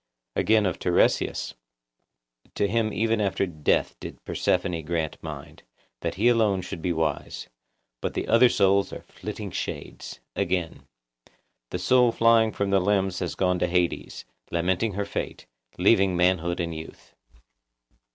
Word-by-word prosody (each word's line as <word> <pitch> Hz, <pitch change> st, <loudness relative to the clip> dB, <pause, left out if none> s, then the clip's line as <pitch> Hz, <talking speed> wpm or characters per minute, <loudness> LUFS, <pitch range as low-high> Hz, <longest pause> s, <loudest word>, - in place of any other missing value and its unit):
Again 110 Hz, -1 st, +3 dB
of 95 Hz, -, -1 dB
Tiresias:— 90 Hz, -, +1 dB, 1.0 s
'(To 100 Hz, -, +1 dB
him 110 Hz, +1 st, 0 dB
even 115 Hz, 0 st, +1 dB
after 95 Hz, -1 st, +1 dB
death 75 Hz, -5 st, 0 dB
did -, -, -8 dB
Persephone 85 Hz, -2 st, 0 dB
grant 80 Hz, -1 st, -2 dB
mind,) -, -, -8 dB, 0.4 s
that -, -, -3 dB
he 110 Hz, +5 st, +2 dB
alone 110 Hz, -6 st, +3 dB
should 85 Hz, -, -6 dB
be 90 Hz, -, 0 dB
wise; 80 Hz, -3 st, -2 dB, 0.5 s
but -, -, -3 dB
the -, -, -2 dB
other 115 Hz, +2 st, +6 dB
souls 100 Hz, -1 st, +3 dB
are -, -, -8 dB
flitting -, -, -7 dB
shades.' -, -, -6 dB, 0.2 s
Again:— 85 Hz, -2 st, -2 dB, 0.8 s
'The -, -, -3 dB
soul 125 Hz, -2 st, +4 dB
flying 115 Hz, -1 st, +4 dB
from 100 Hz, -1 st, -2 dB
the 100 Hz, -, +4 dB
limbs 95 Hz, -1 st, +1 dB
had 90 Hz, -3 st, -3 dB
gone 90 Hz, -1 st, +1 dB
to -, -, +1 dB
Hades, 90 Hz, 0 st, -1 dB, 0.2 s
lamenting 95 Hz, +5 st, 0 dB
her 100 Hz, +1 st, -2 dB
fate, 100 Hz, -, -5 dB, 0.3 s
leaving 95 Hz, -1 st, +4 dB
manhood 85 Hz, -1 st, +2 dB
and 85 Hz, -1 st, -2 dB
youth. 80 Hz, 0 st, -10 dB
95 Hz, 140 wpm, -26 LUFS, 85-110 Hz, 1.0 s, other